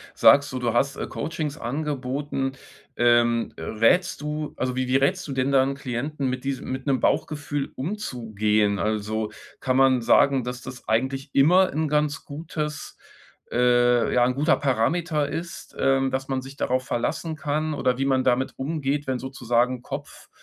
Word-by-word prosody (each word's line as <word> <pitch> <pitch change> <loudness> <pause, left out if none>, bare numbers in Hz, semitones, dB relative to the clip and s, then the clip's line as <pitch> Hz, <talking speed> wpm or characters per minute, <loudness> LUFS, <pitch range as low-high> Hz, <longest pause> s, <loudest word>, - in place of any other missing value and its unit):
sagst 140 0 +6
du, 130 - -3
du 120 -2 0
hast 140 +3 +1
äh, - - -4
Coachings 155 -2 -4
angeboten 135 0 -3 0.4
ähm, 120 -1 +3
rätst 115 - +2
du 150 0 -4
also 125 -1 -1
wie 130 0 -1
wie 130 - +1
rätst 155 +6 +1
du 140 - -4
denn 130 +1 0
dann 135 0 +3
Klienten 135 +1 -3
mit 130 0 -4
dies 135 -1 -2
mit 130 +2 -5
'nem 135 -2 +2
Bauchgefühl 145 -2 -1
umzugehen? 110 - -1
Also, 110 +1 -1 0.3
kann 130 -1 0
man 130 -2 +4
sagen, 135 +2 +4
dass 125 0 -5
das 125 -2 -10
eigentlich 135 +5 0
immer 180 +7 +5
'n 155 +1 -1
ganz 150 -1 0
gutes 150 0 -5 0.5
äh, 120 0 +3
ja, 120 - +5
'n 125 - +1
guter 145 +5 +3
Parameter 150 +4 0
ist, 170 +1 -6
ähm, 135 0 +2
dass 130 0 -3
man 135 -1 -1
sich 135 +2 -11
darauf 130 0 0
verlassen 160 +6 -2
kann 155 +1 -2
oder 125 -2 0
wie 135 - +1
man 130 -1 +2
damit 130 +1 +1
umgeht, 145 0 -2
wenn 130 -1 -2
sozusagen 125 -1 0
Kopf - - -8
135 Hz, 165 wpm, -24 LUFS, 125-145 Hz, 0.5 s, sagst